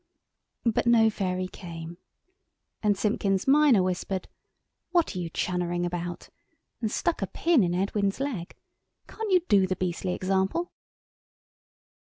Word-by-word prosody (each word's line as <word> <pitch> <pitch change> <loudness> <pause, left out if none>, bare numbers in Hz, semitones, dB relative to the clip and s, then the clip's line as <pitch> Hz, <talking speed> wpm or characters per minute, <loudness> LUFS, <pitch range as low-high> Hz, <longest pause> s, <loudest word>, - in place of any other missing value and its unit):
But 230 +1 +1
no 225 -2 +5
Fairy 185 -2 -2
came. 170 -2 -9 0.8
And 205 -2 +2
Simpkins 195 -1 0
minor 275 -7 +5
whispered— 185 +1 -2 0.6
"What 345 - +1
are - - -2
you 170 -2 -3
chunnering 175 0 -1
about?" 175 0 -4 0.5
and 220 - 0
stuck 330 +7 -1
a 195 - 0
pin 330 - +2
into 175 0 0
Edwin's 200 +2 0
leg. 245 -12 -4 0.5
"Can't 445 -1 -5
you 365 -1 +5
do 195 -3 +4
the 185 - -1
beastly 180 0 -2
example?" 195 - 0
190 Hz, 130 wpm, -27 LUFS, 180-230 Hz, 0.8 s, no